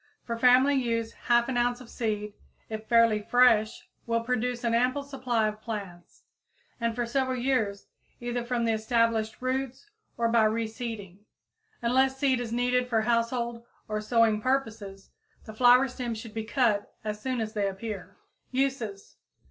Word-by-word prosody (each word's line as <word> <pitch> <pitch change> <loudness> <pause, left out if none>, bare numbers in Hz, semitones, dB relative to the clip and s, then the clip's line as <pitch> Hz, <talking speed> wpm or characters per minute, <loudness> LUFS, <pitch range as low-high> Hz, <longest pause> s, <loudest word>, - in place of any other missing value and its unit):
For 235 - -3
family 255 +4 +5
use 230 -4 0
half 240 0 +2
an 260 -2 -1
ounce 245 0 +1
of 250 - -12
seed, 210 -3 -3 0.4
if 220 0 -6
fairly 230 -2 +4
fresh, 225 -1 +3 0.2
will 230 0 +1
produce 245 0 -1
an 235 -1 +1
ample 255 +4 +1
supply 255 -5 -1
of 215 0 -5
plants, 200 -6 -7 0.6
and 230 -1 -1
for 240 0 -1
several 260 +1 -1
years, 240 -6 0 0.3
either 240 0 -3
from 240 -1 -1
the 225 - +2
established 225 0 0
roots 265 - -3 0.3
or 230 0 +2
by 230 -1 +4
reseeding. 220 -3 -3 0.6
Unless 265 +3 +2
seed 265 -2 +2
is 240 -2 -4
needed 250 +1 +1
for 225 -2 +2
household 235 +1 -1 0.2
or 215 0 -2
sowing 220 -1 +2
purposes, 220 -6 -2 0.3
the 220 - -9
flower 250 +3 +6
stems 245 -3 -4
should 225 -1 -9
be 220 -1 -4
cut 225 -4 +1
as 210 -1 -4
soon 255 0 -2
as 220 -1 -3
they 205 -3 0
appear. 195 -1 -6 0.3
_Uses. 255 -7 -2
235 Hz, 155 wpm, -28 LUFS, 220-250 Hz, 0.6 s, flower